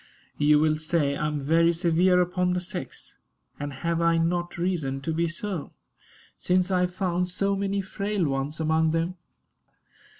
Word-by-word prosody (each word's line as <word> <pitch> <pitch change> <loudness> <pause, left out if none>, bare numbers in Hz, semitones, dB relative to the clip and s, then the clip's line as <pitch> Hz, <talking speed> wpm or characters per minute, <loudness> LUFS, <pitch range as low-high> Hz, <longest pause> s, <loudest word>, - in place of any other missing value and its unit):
You 150 0 +5
will 155 0 +2
say 155 -3 +1
I 150 - -1
am 150 -1 -2
very 165 +4 +3
severe 175 +2 +3
upon 180 0 0
the 180 - 0
sex; 180 - -6 0.5
and 145 0 -4
have 170 +5 -2
I 170 0 +3
not 175 +1 -1
reason 170 -7 -1
to 160 +4 -2
be 170 +1 +1
so, 170 -1 -4 0.7
since 180 +1 +1
I 185 - +3
have 180 0 0
found 180 -1 0
so 195 +2 0
many 200 0 -1
frail 200 0 -2
ones 140 +2 -2
among 160 0 +2
them? 165 +3 -1
170 Hz, 165 wpm, -26 LUFS, 155-180 Hz, 0.7 s, You